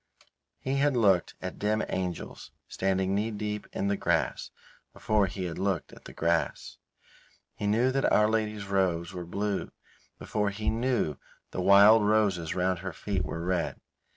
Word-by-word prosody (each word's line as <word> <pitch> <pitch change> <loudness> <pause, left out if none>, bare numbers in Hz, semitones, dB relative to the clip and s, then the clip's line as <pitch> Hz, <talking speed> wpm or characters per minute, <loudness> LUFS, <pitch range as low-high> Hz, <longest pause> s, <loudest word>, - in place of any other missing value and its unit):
He 135 +1 -2
had 140 -2 +2
looked 95 -6 +3
at - - -5
dim 110 +1 +1
angels 90 -2 -4 0.2
standing 95 0 0
knee 105 +3 0
deep 105 -1 -4
in 100 - -2
the 100 - +1
grass 80 -9 -1 0.4
before 105 -2 +1
he 95 +1 -5
had 85 -2 -5
looked 95 -4 -1
at - - -15
the - - -9
grass. 85 0 -1 0.7
He 105 - -4
knew 115 +5 +3
that 135 +1 +1
Our 105 - +5
Lady's 110 -2 -1
robes 95 -3 0
were 90 -1 -6
blue 100 +2 -2 0.5
before 105 -1 -1
he 105 +2 -2
knew 115 - 0 0.3
the 95 - -3
wild 100 +3 +7
roses 105 -6 +1
round 90 -1 0
her 95 -1 -5
feet 100 +2 -2
were 80 - -4
red. 90 -2 -1
100 Hz, 160 wpm, -28 LUFS, 90-105 Hz, 0.7 s, wild